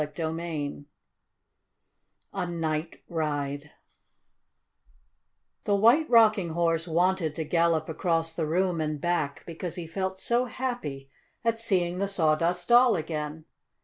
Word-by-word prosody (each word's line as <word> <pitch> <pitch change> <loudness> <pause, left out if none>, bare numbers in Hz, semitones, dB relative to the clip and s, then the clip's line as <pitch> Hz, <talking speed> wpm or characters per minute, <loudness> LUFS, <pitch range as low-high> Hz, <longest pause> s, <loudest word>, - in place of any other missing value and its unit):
CHAPTER 150 +2 -3
V 160 -4 -4 1.5
A 185 -3 -2
NIGHT 165 -1 -3
RIDE 145 -3 -3 2.0
The 205 - +2
White 235 +10 +4
Rocking 215 -6 +5
Horse 165 0 +1
wanted 170 -1 +1
to 160 - -2
gallop 165 0 +1
across 165 0 -1
the 165 -2 -2
room 175 +1 +1
and 155 -1 -2
back, 160 -4 -1
because 170 +1 -6
he 175 - -5
felt 190 +3 -3
so 240 +5 +1
happy 220 - -5 0.3
at 230 0 +1
seeing 180 -5 0
the 200 - 0
Sawdust 175 -1 +1
Doll 240 -1 +6
again. 155 -1 -4
170 Hz, 120 wpm, -27 LUFS, 155-190 Hz, 2.0 s, Doll